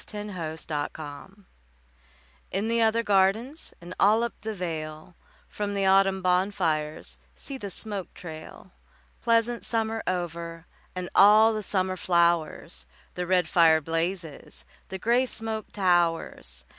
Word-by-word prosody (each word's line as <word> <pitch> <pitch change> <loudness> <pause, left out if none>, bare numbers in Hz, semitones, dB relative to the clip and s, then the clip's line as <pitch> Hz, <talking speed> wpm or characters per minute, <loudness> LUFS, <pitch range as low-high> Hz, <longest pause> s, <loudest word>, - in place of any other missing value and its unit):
VI 210 -1 -5
Autumn 160 -3 -3
Fires 150 +3 -8 1.2
In 200 +4 -1
the 230 0 +2
other 225 +1 +3
gardens 210 +9 +1
And 175 +1 -9
all 215 +3 +5
up 235 - -2
the 220 0 -4
vale, 160 -2 -5 0.3
From 205 -1 -4
the 195 -1 +1
autumn 190 0 +4
bonfires 180 -5 0 0.2
See 275 - -5
the 200 - -5
smoke 200 -1 -4
trail! 160 -3 -10 0.5
Pleasant 230 +1 +2
summer 225 -1 -1
over 170 -2 -3 0.3
And 180 -1 -4
all 215 +3 +7
the 215 - -2
summer 185 -2 -1
flowers, 170 - +1 0.3
The 180 0 -4
red 180 -2 +3
fire 160 -1 +5
blazes, 165 0 -3 0.2
The 190 - -4
grey 240 +6 +2
smoke 220 -3 -4
towers. 170 - 0
185 Hz, 130 wpm, -27 LUFS, 165-215 Hz, 1.2 s, all